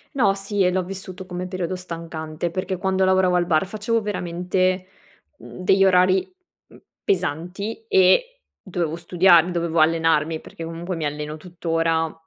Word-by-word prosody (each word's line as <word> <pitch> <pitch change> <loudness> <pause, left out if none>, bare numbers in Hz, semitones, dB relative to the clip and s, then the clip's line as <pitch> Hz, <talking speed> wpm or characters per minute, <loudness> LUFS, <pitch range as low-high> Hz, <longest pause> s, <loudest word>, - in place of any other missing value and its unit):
No, 210 -8 +3
sì 195 +1 -3
e 180 - +3
l'ho 185 0 0
vissuto 185 0 -8
come 180 0 -5
periodo 185 -1 -3
stancante 165 -2 -5
perché 185 +2 -3
quando 190 +1 +1
lavoravo 185 -1 +3
al 175 - +2
bar 160 0 +2
facevo 215 +3 -1
veramente, 185 -1 -1 0.5
mhmm, - - -12
degli 195 +1 +4
orari, 185 0 +3 0.4
mhmm, - - -17 0.2
pesanti 200 - -2
e - - +3 0.2
dovevo 170 -4 -3
studia 175 0 +5
dovevo 170 -1 -1
allenarmi- 160 0 +2
perché 165 - -9
comunque 170 +2 -5
mi 155 - -2
alleno 150 +1 -4
tuttora 165 -1 -1
180 Hz, 145 wpm, -22 LUFS, 165-190 Hz, 0.5 s, studia